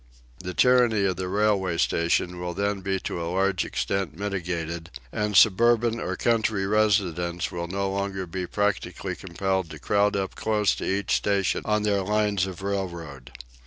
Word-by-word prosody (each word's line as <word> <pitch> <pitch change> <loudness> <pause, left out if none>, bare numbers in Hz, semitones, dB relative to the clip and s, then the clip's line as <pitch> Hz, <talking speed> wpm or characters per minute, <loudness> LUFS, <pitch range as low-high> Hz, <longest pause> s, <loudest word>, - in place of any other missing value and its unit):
The 90 -1 -6
tyranny 120 -5 +4
of 95 -3 0
the 95 0 -3
railway 100 -3 +1
station 85 +2 +1
will 90 -1 -4
then 100 0 -1
be 95 0 -1
to 85 - -4
a 85 - -3
large 95 0 +1
extent 80 +6 -2
mitigated, 85 -4 -3 0.2
and 105 -1 0
suburban 115 +3 +4
or - - -3
country 110 -4 +1
residents 95 -5 +1
will 85 0 -4
no 100 +2 -2
longer 100 -1 -2
be 90 +1 -4
practically 95 -2 -2
compelled 95 0 -2
to 75 - -8
crowd 100 +6 +1
up 95 -1 -2
close 105 -2 +1
to - - -4
each 100 +1 +1
station 100 -2 +1
on 105 0 +1
their 100 -2 +1
lines 105 -1 +1
of 95 0 -8
railroad. 85 -10 -4
95 Hz, 160 wpm, -25 LUFS, 90-105 Hz, 0.2 s, tyranny